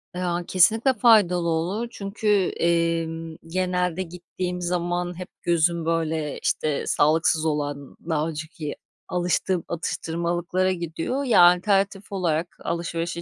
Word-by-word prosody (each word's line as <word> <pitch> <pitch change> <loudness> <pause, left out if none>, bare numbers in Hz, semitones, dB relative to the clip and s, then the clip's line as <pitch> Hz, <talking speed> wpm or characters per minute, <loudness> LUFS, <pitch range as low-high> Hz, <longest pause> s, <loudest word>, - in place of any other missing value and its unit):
Ya, 175 -1 -1
kesinlikle 220 +8 +4
faydalı 205 -7 +4
olur 180 +8 -1
çünkü, 200 0 -5 0.3
eee, 170 0 +2 0.4
genelde 180 0 -1
gittiğim 180 +1 -5
zaman 175 0 -2
hep 180 - -6
gözüm, 170 0 +1
böyle, 160 -2 -1
işte, 150 -2 -1
sağlıksız 160 +1 +3
olan 145 -2 -3
daha 160 0 0
önceki 155 -1 -6 0.3
alıştığım 180 0 0
atıştırmalıklara 175 +2 -1
gidiyor. 170 - -3
Ya, 245 -8 +5
alternatif 195 +3 +3
olarak 175 -3 -1
alışverişe 170 0 -3
175 Hz, 110 wpm, -24 LUFS, 165-185 Hz, 0.4 s, Ya